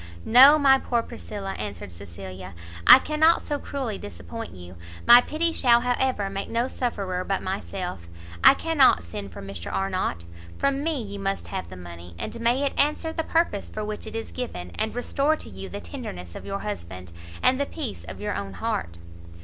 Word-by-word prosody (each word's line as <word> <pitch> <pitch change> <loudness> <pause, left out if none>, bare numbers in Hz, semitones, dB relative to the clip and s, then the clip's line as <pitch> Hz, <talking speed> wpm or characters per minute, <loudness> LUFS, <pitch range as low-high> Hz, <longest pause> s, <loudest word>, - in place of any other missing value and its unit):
"No, 270 +6 +9
my 270 -2 +5
poor 235 -3 0
Priscilla," 200 -3 -6
answered 100 -3 -6
Cecilia, 90 +2 -9 0.3
"I - - +12
cannot 310 +4 +3
so 290 -2 -2
cruelly 260 -9 -4
disappoint 85 -1 -8
you; 90 0 -11 0.3
my 240 +1 +10
pity 325 +5 0
shall 240 -5 +4
however 250 -4 0
make 195 0 -4
no 235 +2 0
sufferer 195 -9 -2
but 195 +1 -2
myself, 185 - -4 0.4
I - - +9
cannot 280 - +4
send 100 +3 -7
for 85 - -9
Mr 95 -3 -7
Arnott, 185 - -2 0.3
from 275 0 0
me 315 -3 0
you 200 -1 -7
must 195 0 -3
have 85 - -4
the 95 - -9
money, 85 -1 -10
and 230 - -5
may 240 +4 +2
it 275 - -1
answer 300 +3 +1
the 320 - -2
purpose 325 -12 0
for 215 0 -4
which 215 +1 -5
it 220 - -8
is 225 - -5
given, 90 - -5
and 220 - -2
restore 280 +5 +1
to - - -11
you 95 -1 -8
the - - -6
tenderness 85 +1 -7
of - - -9
your 195 0 -3
husband, 90 - -6 0.3
and 260 +2 +4
the 280 - 0
peace 85 -3 -5
of 80 -1 -8
your - - -2
own 100 0 -5
heart!" 85 -2 -3
200 Hz, 190 wpm, -25 LUFS, -, 0.4 s, I